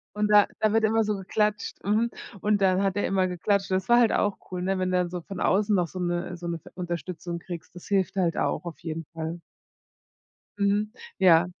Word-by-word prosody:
und 210 0 +1
da 210 -1 +6
da 215 0 +2
wird 225 - +3
immer 220 +1 +3
so 210 0 0
geklatscht, 210 +2 -1
mhm, 220 +4 +1 0.3
und 210 -1 +2
dann 190 0 +3
hat 195 -1 +1
er 205 - 0
immer 190 -1 +2
geklatscht, 195 +2 0
und 185 - +4
das 190 +4 -6
war 240 0 +7
halt 230 -3 +4
auch 205 -1 +1
cool, 180 - -3
ne? 190 +1 0
Wenn 185 0 0
du 180 - +2
dann 180 -1 +1
so 180 -1 -5
von 190 +2 -8
außen 205 +2 +2
noch 180 -3 +2
so 185 - -8
'ne 175 0 -2
so 175 - -6
'ne 170 -1 -3
ve - - -14
Unterstützung 175 -1 -4
kriegst, 170 0 -8
das 180 - -11
hilft 195 -1 +1
halt 175 -4 +1
auch - - 0
auf 170 - -7
jeden 165 -1 -5
Fall. 165 +1 -4 1.2
Mhm. 205 +1 +1 0.3
Ja. 175 -2 +6
185 Hz, 230 wpm, -26 LUFS, 175-205 Hz, 1.2 s, war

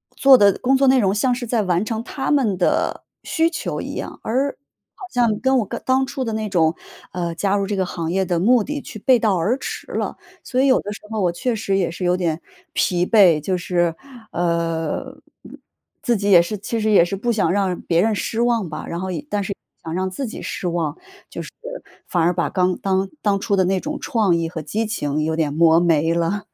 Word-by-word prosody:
做 275 -1 +7
的 200 -3 +5
工 265 +2 +2
作 270 0 +3
内 260 0 +5
容 195 -4 +2
像 250 +4 +2
是 245 0 -5
在 225 -1 +1
完 180 +1 0
成 225 0 -3
他 270 +3 -3
们 245 -10 +2
的 180 - 0 0.2
需 325 +1 +1
求 335 - -4
一 - - -6
样， - - -6
而 265 +5 +1 0.5
好 385 - -9
像 235 -4 +2
跟 265 0 +3
我 220 - -1 0.2
当 260 +1 +3
初 270 0 -4
的 225 - -3
那 215 -1 -2
种， 165 -4 +2 0.4
呃， 175 -2 -2
加 195 +3 +1
入 200 -1 0
这 205 - -2
个 190 -1 0
行 170 -2 -4
业 190 +1 +1
的 175 -1 0
目 230 +5 +4
的 290 +5 -4
去 220 - -9
背 250 +3 +4
道 210 -4 +2
而 200 +9 +1
驰 - - -6
了， - - -3 0.3
所 255 - -2
以 - - +3
有 260 - +4
的 205 - -6
时 - - -11
候 220 -1 -1
我 180 -2 +2
确 230 +8 -2
实 200 -3 -1
也 185 -3 +1
是 180 - -6
有 180 +1 +2
点 170 -2 -1 0.3
疲 175 -1 +1
惫， 185 -7 +5
就 185 +5 -1
是， 175 -2 0 0.4
呃， 165 -2 -1 0.9
自 240 -5 +2
己 200 +1 -1
也 175 -3 +8
是 190 +5 -3
其 225 +3 -3
实 215 0 +1
也 195 -5 +6
是 175 - -3
不 235 +5 -1
想 215 -7 +1
让 190 -2 0
别 170 0 +1
人 220 +3 +2
失 225 +4 -2
望 235 -6 +1
吧， 155 - -6
然 170 - -4
后 190 +1 -3
也 285 - -5
但 205 - -1
是 200 - -3
也 - - -40 0.3
想 160 -1 -5
让 185 +2 -1
自 255 +8 -4
己 - - -7
失 180 - -4
望， 170 -3 -2 0.3
就 - - -6
是 - - -8 0.6
反 175 - +1
而 175 +2 +3
把 170 -1 -1
刚 180 -1 +1
当 190 0 0
当 200 -2 +1
初 205 0 0
的 190 - +3
那 190 +1 +1
种 300 +9 -4
创 215 -9 +1
意 165 -1 -1
和 165 -1 -5
激 210 +10 -2
情 155 -8 -2
有 160 +1 -1
点 155 -3 0
磨 165 +1 +5
没 165 -2 +2
了。 170 +5 -1
195 Hz, 255 characters per minute, -21 LUFS, 170-225 Hz, 0.9 s, 也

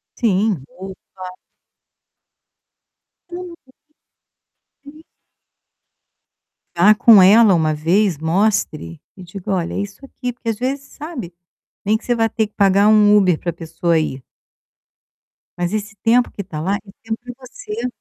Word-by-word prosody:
Sim 205 - 0
ou 190 +3 -10 0.2
claro! 185 -1 -8 2.0
Hum, 355 0 -8 1.3
sim. 300 +2 -15 1.7
Vá 200 +5 +5
com 225 -2 +7
ela 205 +2 +6
uma 160 -3 +1
vez, 175 +4 +1
mostre 160 - -1 0.2
e 185 - -12
diga: 185 +3 -7
"Olha, 175 -3 -2
é - - -2
isso 205 +6 -7
aqui", 250 -2 -6
porque 235 -1 -6
às 225 - -1
vezes 270 +4 -3
sabe, 285 - -8 0.5
nem 210 +2 +2
que - - -22
você 240 - +1
vai 225 -1 +1
ter 220 0 -1
que 210 - -36
pagar 200 0 +4
um 210 -1 +5
Uber 185 -5 +2
pra 170 - -4
pessoa 165 0 -1
ir 135 -4 -4 1.3
mas 175 0 -2
esse 215 0 -4
tempo 240 +2 +3
que 200 - -7
tá 165 -5 -7
lá 190 +5 0
é 205 0 -17
tempo 225 0 -4
que 245 - -8
você 245 -2 -7
205 Hz, 145 wpm, -19 LUFS, 175-230 Hz, 2.0 s, com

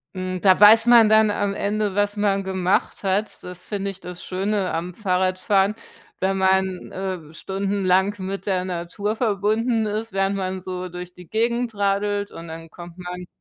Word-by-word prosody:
Hm, 185 0 -3
da 190 -2 +5
weiß 220 +2 +8
man 235 -3 +7
dann 215 0 +5
am 205 -1 -1
Ende, 205 0 -1
was 205 0 +1
man 200 -1 +1
gemacht 190 +1 0
hat, 200 +2 -1
das 180 0 -10
finde 200 -1 -2
ich 195 - -14
das 180 -1 -9
Schöne 195 +1 -1
am 170 +2 -3
Fahrradfahren, 190 +1 +1 0.4
wenn 195 +1 0
man, 190 -1 +1
äh, 185 -5 -5
stundenlang 195 +1 0
mit 190 0 -5
der 185 -2 0
Natur 185 +4 -3
verbunden 220 +1 +1
ist, 215 +1 -3
während 195 0 +1
man 185 -1 -3
so 185 0 -5
durch 180 0 -8
die 180 -1 -14
Gegend 235 +3 -1
radelt 205 0 0
und 165 - -9
dann 165 0 -9
kommt 175 +1 -11
man 180 0 -7
195 Hz, 170 wpm, -23 LUFS, 185-205 Hz, 0.4 s, weiß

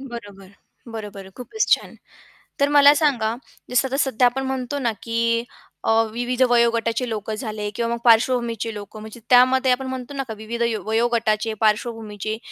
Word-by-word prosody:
बरोबर. 205 -7 -10 0.4
बरोबर, 205 -4 -8
खूपच 430 - -2
छान. - - +1 0.6
तर 280 +1 +3
मला 285 0 +7
सांगा, 240 -8 +1 0.3
जसं 250 +2 +2
आता 270 - -3
सध्या 265 -3 +2
आपण 265 +2 -2
म्हणतो 265 +1 -3
ना, 240 -4 0
की 230 0 0 0.4
अ, - - +1 0.2
विविध 245 +2 -2
वयोगटाचे 235 0 +2
लोक 215 -1 -5
झाले 215 -2 -4
किंवा 235 +1 -1
मग 235 - -4
पार्श्वभूमीचे 230 -1 +2
लोक, 205 +1 -9
म्हणजे 220 +2 -10
त्यामध्ये 255 +1 +5
आपण 260 +1 0
म्हणतो 260 +1 -6
ना, 270 -1 -3
का 220 - -5
विविध 225 +2 -6
य 230 -2 0
वयोगटाचे, 225 -1 0
पार्श्वभूमीचे 215 -1 -1
235 Hz, 160 wpm, -22 LUFS, 220-255 Hz, 0.6 s, मला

